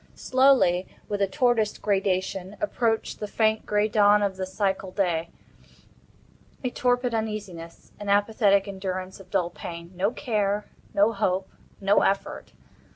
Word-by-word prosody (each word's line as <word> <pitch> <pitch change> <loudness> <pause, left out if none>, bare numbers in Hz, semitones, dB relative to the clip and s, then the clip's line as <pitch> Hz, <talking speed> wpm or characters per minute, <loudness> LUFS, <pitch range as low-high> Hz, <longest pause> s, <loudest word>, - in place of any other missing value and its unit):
Slowly—with 210 -7 +2
a 200 - +3
tortoise 225 +1 +1
gradation—approached 200 +4 -1
the 210 - -4
faint 220 +1 +1
gray 210 0 +2
dawn 210 -1 +4
of 195 -2 0
the 190 0 -3
psychal 190 0 -1
day. 170 -4 0 1.3
A 250 - -1
torpid 245 -1 +1
uneasiness. 205 -7 -5
An 205 -1 -5
apathetic 205 -1 +3
endurance 190 -1 -5
of 190 -1 -14
dull 175 -1 0
pain. 170 0 -8
No 190 +3 +1
care—no 210 -3 -1
hope—no 195 0 -1
effort. 195 0 -1
200 Hz, 115 wpm, -26 LUFS, 190-215 Hz, 1.3 s, dawn